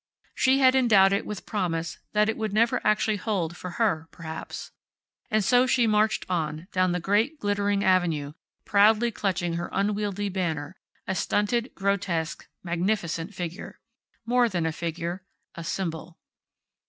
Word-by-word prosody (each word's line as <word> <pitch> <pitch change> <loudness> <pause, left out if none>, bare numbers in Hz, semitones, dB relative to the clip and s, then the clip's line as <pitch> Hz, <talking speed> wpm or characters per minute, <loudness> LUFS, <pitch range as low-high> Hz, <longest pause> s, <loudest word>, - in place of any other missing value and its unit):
She 260 +1 +3
had 260 -1 +5
endowed 210 -7 +5
it 200 - -1
with 210 - -6
promise 170 -5 -2
that 210 0 +3
it 220 - 0
would 220 -2 -3
never 230 +2 +2
actually 215 0 +2
hold 185 -5 -2
for 180 - -7
her, 180 -9 +1
perhaps. 160 -2 -7 0.6
And 215 -1 +2
so 250 +4 +4
she 245 -1 +3
marched 215 0 +2
on, 160 -2 -2
down 185 -1 +2
the 180 - 0
great, 215 - +1
glittering 205 -1 0
avenue, 165 -6 +1 0.3
proudly 215 +3 +4
clutching 175 -5 -1
her 175 - -4
unwieldy 205 0 -1
banner, 170 -4 -3 0.3
a 190 - -1
stunted, 225 +6 0
grotesque, 185 -4 -1 0.2
magnificent 175 0 -2
figure. 175 +1 -6 0.5
More 240 0 +3
than 175 -5 -1
a 160 - +1
figure. 170 +3 -4 0.3
A 170 - -7
symbol. 165 -1 -4
195 Hz, 145 wpm, -26 LUFS, 170-215 Hz, 0.6 s, had